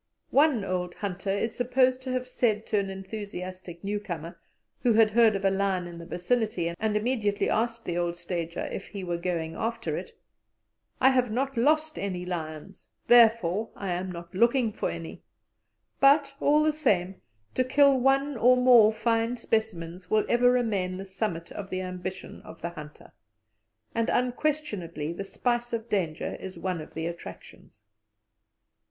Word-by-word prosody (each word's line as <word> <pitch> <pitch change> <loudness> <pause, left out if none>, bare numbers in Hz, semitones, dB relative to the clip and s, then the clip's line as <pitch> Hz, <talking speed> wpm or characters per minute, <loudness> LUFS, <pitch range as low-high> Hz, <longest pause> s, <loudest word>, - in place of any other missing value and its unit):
One 275 -7 +4
old 180 -2 -2
hunter 195 -1 -4
is 200 +4 -1
supposed 255 +1 +2
to 260 0 -5
have 255 0 -2
said 225 -4 0
to 210 - +1
an 195 -1 -2
enthusiastic 185 -3 -7
newcomer, 175 -5 -4 0.4
who 240 - +3
had 220 -1 +5
heard 225 -1 +5
of 195 0 -2
a 195 - +4
lion 190 -2 0
in 170 -1 -9
the 170 - -9
vicinity, 180 -3 -1
and 215 -1 +1
immediately 210 -3 0
asked 230 +1 -1
the 175 0 -1
old 175 0 -1
stager 170 -1 -4
if - - -6
he 200 -2 -7
were 175 -1 -2
going 170 -2 -2
after 230 +1 -2
it: - - -7 0.9
"I 265 - +6
have 255 -2 +2
not 265 +5 -1
lost 310 +6 +2
any 180 -3 -3
lions, 155 -4 -6 0.2
therefore 225 -4 +5
I 195 -2 -4
am 180 +1 -2
not 170 0 -9
looking 235 +2 +3
for - - -2
any"; 165 -1 -7 0.8
but, 280 0 +5
all 300 +1 +4
the 310 0 +2
same, 195 -11 0 0.3
to 255 - +2
kill 275 +1 +4
one 270 +2 +2
or 250 +3 +5
more 245 -4 +7
fine 230 +2 0
specimens 185 -6 -2
will 215 0 +3
ever 245 +1 +4
remain 205 -7 0
the 195 - -6
summit 190 -4 -4
of 195 -1 -7
the 185 -1 -2
ambition 185 0 -6
of 165 - -12
the 170 - -1
hunter, 150 -3 -11 0.8
and 230 0 0
unquestionably 245 - -1
the 185 - -5
spice 240 +4 -2
of 230 0 -3
danger 175 -6 -2
is 190 0 -8
one 180 -3 -3
of 155 - -12
the 160 - -3
attractions. 110 - -9
205 Hz, 165 wpm, -27 LUFS, 180-240 Hz, 0.9 s, more